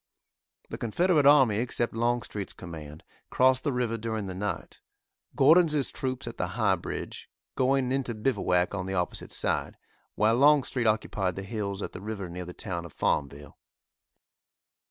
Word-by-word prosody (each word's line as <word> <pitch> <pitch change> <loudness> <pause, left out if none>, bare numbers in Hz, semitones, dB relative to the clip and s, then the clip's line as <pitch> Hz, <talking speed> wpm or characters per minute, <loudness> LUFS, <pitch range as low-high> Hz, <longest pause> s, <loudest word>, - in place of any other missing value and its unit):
The - - -6
Confederate 150 - +2
army, 135 -8 +6
except 120 0 -1
Longstreet's 115 -3 -2
command, 80 -4 -9 0.3
crossed 130 0 +3
the 145 - 0
river 120 -3 -1
during 110 -2 -3
the 95 - -5
night, 100 +3 -5 0.5
Gordon's 150 -1 +4
troops 130 0 -4
at 115 0 -7
the 90 - -1
High 105 -5 +3
Bridge 85 - -6 0.2
going 130 0 +1
into 130 -3 -1
bivouac 100 -6 +1
on 95 -2 -3
the 95 - -3
opposite 90 -1 -2
side, - - -1 0.4
while 110 +2 +3
Longstreet 135 -4 +4
occupied 100 -4 0
the 95 - -5
hills 100 -1 -4
at - - -5
the - - -9
river 100 -3 -5
near 90 +1 -6
the 90 - -8
town 85 -1 -4
of 85 - -11
Farmville. 70 0 -2
110 Hz, 155 wpm, -28 LUFS, 95-130 Hz, 0.5 s, army